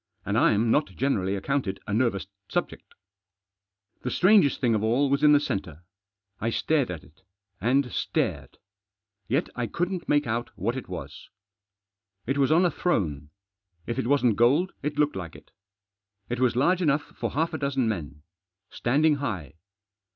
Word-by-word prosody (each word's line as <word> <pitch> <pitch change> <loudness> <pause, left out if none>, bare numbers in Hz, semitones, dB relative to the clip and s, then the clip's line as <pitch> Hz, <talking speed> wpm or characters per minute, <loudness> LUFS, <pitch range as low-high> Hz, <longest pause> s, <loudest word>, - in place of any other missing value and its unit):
And - - -1
I'm 110 +2 +3
not 150 - +3
generally 100 -8 0
accounted 100 -2 -2
a 105 - -4
nervous 115 -4 +1 0.2
subject. - - -4 1.1
The 125 - -3
strangest 185 -2 +4
thing 120 -3 +2
of 105 -1 0
all 130 +5 +2
was 140 0 +2
in 150 -1 +6
the 145 - +6
centre. 90 - -4 0.6
I 115 - -1
stared 145 +3 +1
at 90 -4 -6
it, 75 +5 -21 0.4
and 125 +4 +1
stared; - - -2 0.7
yet 140 +9 +1
I 120 -1 -2
couldn't 175 +4 -3
make 145 0 +3
out 120 +1 -2
what 110 +6 -1
it 130 - -6
was. - - -8 1.0
It 135 +3 -1
was 135 +1 +3
on 170 +3 +5
a 175 - +2
throne; 75 - -1 0.6
if 120 - -3
it - - -1
wasn't 125 -6 +3
gold 140 +11 +3
it 145 0 -3
looked 150 0 +2
like 90 -4 -6
it. - - -16 0.8
It 120 0 -2
was 125 -2 +2
large 175 +8 +2
enough 150 -3 +2
for - - -6
half 160 +4 0
a 160 - -3
dozen 135 -4 0
men. 75 -9 -4 0.5
Standing 145 +5 +2
high. 95 - -4
125 Hz, 165 wpm, -26 LUFS, 105-145 Hz, 1.1 s, in